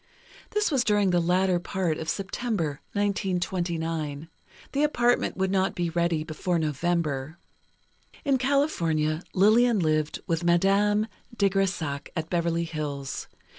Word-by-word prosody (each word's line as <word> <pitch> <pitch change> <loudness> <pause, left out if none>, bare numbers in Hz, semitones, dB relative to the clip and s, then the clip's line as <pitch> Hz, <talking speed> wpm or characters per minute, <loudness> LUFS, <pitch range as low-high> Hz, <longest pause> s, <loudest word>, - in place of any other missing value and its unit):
This 420 -3 0
was 265 -4 +2
during 205 -4 +3
the 175 - +3
latter 180 +1 +2
part 175 -2 -2
of 160 - -4
September, 195 - -2
1929. 175 -6 -2 0.4
The 280 - 0
apartment 245 -9 +2
would 190 0 0
not 190 -1 +1
be 175 -1 -1
ready 170 -2 +1
before 160 +3 -2
November." 155 -1 -1 0.9
In 275 -2 +2
California, 170 - +1
Lillian 220 +4 +5
lived 155 -3 0
with 170 -2 -1
Madame 195 +5 +3 0.3
de 200 -1 +3
Grésac, 180 -7 -1
at 160 -1 -4
Beverly 170 -1 +1
Hills. 150 -4 -4
175 Hz, 125 wpm, -26 LUFS, 160-200 Hz, 0.9 s, Lillian